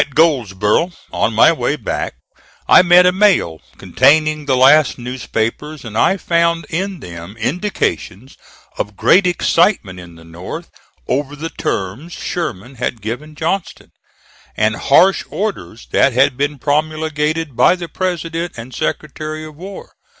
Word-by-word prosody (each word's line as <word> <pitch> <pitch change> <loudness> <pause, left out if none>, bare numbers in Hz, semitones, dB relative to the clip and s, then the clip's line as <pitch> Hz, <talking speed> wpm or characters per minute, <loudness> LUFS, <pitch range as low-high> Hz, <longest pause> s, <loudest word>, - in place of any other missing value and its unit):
At 140 - -5
Goldsboro', 130 - +2 0.2
on - - 0
my - - +6
way - - -1
back, - - -4 0.5
I - - +8
met 180 0 +6
a 180 - +5
mail, 185 - +2 0.2
containing 150 +2 +2
the 130 -2 +2
last 140 +3 +5
newspapers, 125 +3 -4
and 110 -2 -8
I 190 - +3
found 170 -1 +1
in 185 0 -3
them 85 +3 -9
indications 130 - -3 0.4
of 105 -1 -4
great 185 +1 +4
excitement 165 - +1
in 85 -1 -12
the 80 - -15
North 85 +2 -8 0.4
over 140 +3 -2
the 160 +3 -6
terms 105 - -4
Sherman 130 - -5
had 120 - -2
given 145 +8 -6
Johnston; 165 +4 -3 0.7
and 110 0 +2
harsh 185 - +4
orders 170 - -4
that 135 - +3
had 130 +2 +3
been 145 +2 -1
promulgated 155 0 -1
by 180 - +4
the 175 -2 -7
President 170 -2 -3
and 120 +2 -9
Secretary 155 0 -4
of 155 -1 -11
War. 190 +5 -10
150 Hz, 140 wpm, -17 LUFS, 115-170 Hz, 0.7 s, I